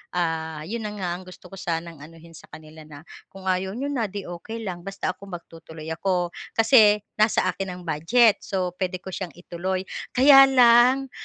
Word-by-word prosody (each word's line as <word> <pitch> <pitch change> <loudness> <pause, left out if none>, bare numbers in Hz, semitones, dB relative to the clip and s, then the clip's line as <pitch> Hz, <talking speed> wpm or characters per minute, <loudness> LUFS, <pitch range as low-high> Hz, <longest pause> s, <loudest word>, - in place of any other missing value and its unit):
ah, 160 -3 -2
'yon 215 +5 -5
na 210 - -7
nga 180 -3 -3
ang 180 +1 -7
gusto 180 0 -14
ko 195 - -10
sanang 170 -3 -4
anuhin 165 +2 -14
sa 165 - -15
kanila 155 0 -13
na 145 -1 -12 0.2
kung 195 -1 -14
ayaw 190 +2 -2
n'yo 280 +4 -3
na 235 -6 -1
'di 200 0 -7
okey 195 +7 -8
lang 185 -4 -5
basta 195 +1 -4
ako 200 +2 -14
magtutuloy 165 -3 -10
ako 175 +1 -1 0.2
kasi 220 -3 +5 0.2
nasa 215 -4 +3
akin 190 0 -6
ang 180 - -11
budget 195 +9 +3
so 185 -2 -3
puwede 185 -1 -2
ko 190 - -7
siyang 175 -5 -6
ituloy 185 +2 -4 0.3
kaya 270 +1 +8
lang 250 +1 +5
185 Hz, 185 wpm, -24 LUFS, 170-215 Hz, 0.3 s, kaya